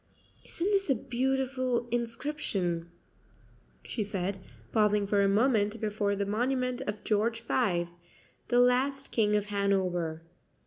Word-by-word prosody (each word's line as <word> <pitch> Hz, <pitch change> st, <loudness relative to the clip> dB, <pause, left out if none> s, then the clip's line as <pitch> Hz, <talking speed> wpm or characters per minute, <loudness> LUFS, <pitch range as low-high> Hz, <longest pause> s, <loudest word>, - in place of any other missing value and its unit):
"Isn't 335 Hz, -, -5 dB
this 390 Hz, -4 st, +1 dB
a 270 Hz, -, +4 dB
beautiful 255 Hz, 0 st, -1 dB
inscription?" 230 Hz, -, -2 dB, 0.9 s
she 225 Hz, -, -4 dB
said, 195 Hz, -1 st, -3 dB, 0.3 s
pausing 210 Hz, -2 st, +3 dB
for 200 Hz, 0 st, +2 dB
a 200 Hz, -, +4 dB
moment 215 Hz, 0 st, +2 dB
before 210 Hz, -2 st, 0 dB
the 200 Hz, 0 st, -1 dB
monument 250 Hz, +4 st, 0 dB
of 210 Hz, 0 st, -4 dB
George 225 Hz, +2 st, +1 dB
V., 185 Hz, -8 st, +1 dB, 0.6 s
the 245 Hz, -, +3 dB
last 265 Hz, +3 st, +2 dB
king 210 Hz, -2 st, +2 dB
of 205 Hz, -1 st, +1 dB
Hanover. 180 Hz, -5 st, 0 dB
220 Hz, 125 wpm, -29 LUFS, 200-250 Hz, 0.9 s, a